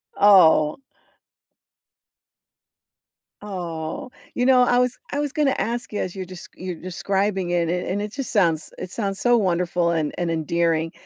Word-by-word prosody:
Oh. 165 Hz, -, +5 dB, 2.6 s
Oh. 175 Hz, -2 st, -5 dB, 0.2 s
You 245 Hz, -, 0 dB
know, 255 Hz, -1 st, +6 dB
I 245 Hz, 0 st, +3 dB
was 250 Hz, 0 st, 0 dB
I 285 Hz, -, -2 dB
was 290 Hz, -2 st, -1 dB
gonna 290 Hz, -3 st, +2 dB
ask 230 Hz, +4 st, -3 dB
you -, -, -2 dB
as 185 Hz, +1 st, -3 dB
you're 190 Hz, -, -5 dB
desc 185 Hz, -1 st, -10 dB
you're 180 Hz, -1 st, -5 dB
describing 190 Hz, +1 st, -2 dB
it, 170 Hz, -2 st, +1 dB
and 180 Hz, +1 st, -2 dB
and 200 Hz, +3 st, -1 dB
it 210 Hz, 0 st, -5 dB
just 275 Hz, -2 st, -5 dB
sounds 170 Hz, -8 st, +1 dB
it 180 Hz, -, -7 dB
sounds 195 Hz, -3 st, -3 dB
so 245 Hz, -1 st, +4 dB
wonderful 175 Hz, -3 st, +1 dB
and 155 Hz, -3 st, -1 dB
and 175 Hz, -2 st, -1 dB
endearing. 165 Hz, 0 st, 0 dB
185 Hz, 155 wpm, -23 LUFS, 170-210 Hz, 2.6 s, know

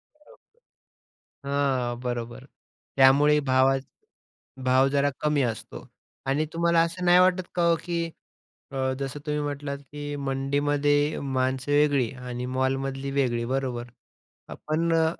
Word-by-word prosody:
बरोबर. 300 Hz, +12 st, -23 dB, 1.0 s
हां, 130 Hz, -4 st, 0 dB
बरोबर 120 Hz, +1 st, -5 dB, 0.5 s
त्यामुळे 145 Hz, +3 st, +6 dB
भावाच 135 Hz, +1 st, +3 dB, 0.8 s
भाव 130 Hz, +1 st, +4 dB
जरा 140 Hz, 0 st, +2 dB
कमी 150 Hz, -2 st, +1 dB
असतो 115 Hz, -3 st, -4 dB, 0.4 s
आणि 140 Hz, +3 st, +1 dB
तुम्हाला 170 Hz, 0 st, +2 dB
असं 180 Hz, +2 st, -4 dB
नाही 175 Hz, 0 st, +6 dB
वाटत 185 Hz, 0 st, +3 dB
का 175 Hz, -, +1 dB
हो, 165 Hz, -, +4 dB
की 170 Hz, -1 st, -2 dB, 0.7 s
अ, 130 Hz, -1 st, -1 dB
जसं 135 Hz, +1 st, -4 dB
तुम्ही 150 Hz, 0 st, -1 dB
म्हटलात 145 Hz, -1 st, -4 dB
की, 145 Hz, +1 st, -7 dB
"मंडीमध्ये 145 Hz, +2 st, +1 dB, 0.2 s
माणसं 130 Hz, +2 st, -1 dB
वेगळी 145 Hz, -5 st, +3 dB, 0.2 s
आणि 125 Hz, 0 st, -4 dB
मॉलमधली 135 Hz, +1 st, -1 dB
वेगळी" 120 Hz, -3 st, +1 dB
बरोबर. 130 Hz, -3 st, -2 dB, 0.6 s
आपण 165 Hz, +2 st, -2 dB
अ, 160 Hz, 0 st, +4 dB
140 Hz, 120 wpm, -26 LUFS, 130-150 Hz, 1.0 s, त्यामुळे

